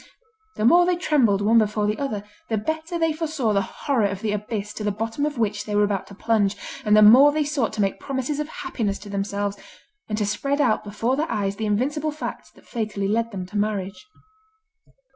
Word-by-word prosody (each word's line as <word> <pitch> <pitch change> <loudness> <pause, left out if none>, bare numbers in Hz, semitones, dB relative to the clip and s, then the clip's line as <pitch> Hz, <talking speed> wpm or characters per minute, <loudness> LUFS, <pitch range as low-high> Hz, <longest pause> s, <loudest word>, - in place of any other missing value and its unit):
The 215 - -1
more 350 +7 +6
they 360 - +3
trembled 265 - +2
one 225 +3 +5
before 210 -1 +1
the 210 +1 -1
other, 220 -8 -3 0.3
the 220 - +1
better 315 - -3
they 325 -1 +1
foresaw 305 -8 -1
the 200 - +3
horror 245 -1 0
of 195 0 -5
the 215 - 0
abyss 210 0 -3
to 215 - -6
the 210 - +1
bottom 225 +7 -2
of 295 -3 -5
which 210 -2 -1
they 210 - -3
were 205 - +4
about 200 -2 -1
to 200 - -12
plunge, 205 -2 +1 0.3
and 210 -1 +4
the 215 - +8
more 255 +7 +8
they 305 +1 +1
sought 285 -5 -1
to 215 - -1
make 195 -1 0
promises 275 +1 -3
of 300 - -2
happiness 240 - -3
to 205 - -11
themselves, 200 0 -2 0.5
and 210 - -1
to 210 - 0
spread 275 +8 -1
out 235 -7 +2
before 225 +5 -1
their 305 +4 -2
eyes 200 -1 -1
the 220 - -2
invincible 285 +9 0
facts 305 +1 -6
that - - -21
fatally 210 -4 -3
led 230 +3 0
them 190 -4 -5
to 195 +4 -13
marriage. 205 - -3
215 Hz, 220 wpm, -23 LUFS, 205-285 Hz, 0.5 s, the